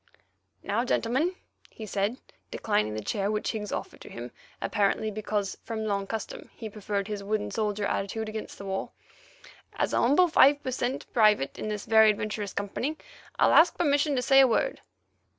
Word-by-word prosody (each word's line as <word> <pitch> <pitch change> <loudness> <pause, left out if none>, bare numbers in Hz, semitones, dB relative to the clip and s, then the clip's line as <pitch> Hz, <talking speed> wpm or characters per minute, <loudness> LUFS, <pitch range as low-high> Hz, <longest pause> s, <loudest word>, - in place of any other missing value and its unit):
"Now, 210 +4 0
gentlemen," 260 +9 0 0.3
he 220 - -9
said, 205 +4 -1 0.3
declining 110 - -1
the 110 - -4
chair 200 - -1
which 210 0 -1
Higgs 210 -2 -5
offered - - -5
to - - -11
him, 120 +1 -8 0.3
apparently 210 +1 0
because, 210 -1 -3
from 220 -1 -4
long 200 -2 -1
custom, 220 -1 -6
he 220 -2 -7
preferred 200 -1 -3
his 205 -2 -5
wooden 210 +1 -2
soldier 210 -2 -1
attitude 215 +3 -2
against 215 0 -6
the 200 - -9
wall, 190 0 -4 0.8
"as - - -1
a - - +3
humble 295 +9 +5
five 290 -3 +5
per 260 - -2
cent. 250 +1 -2
private 210 - +3
in - - -4
this 210 -1 -4
very 220 -1 +6
adventurous 210 -1 -2
company 240 +9 -3 0.4
I'll - - +4
ask 330 +1 +6
permission 290 -2 +2
to 250 - 0
say 270 +1 +6
a 270 - +7
word." 375 - 0
215 Hz, 175 wpm, -27 LUFS, 200-245 Hz, 0.8 s, a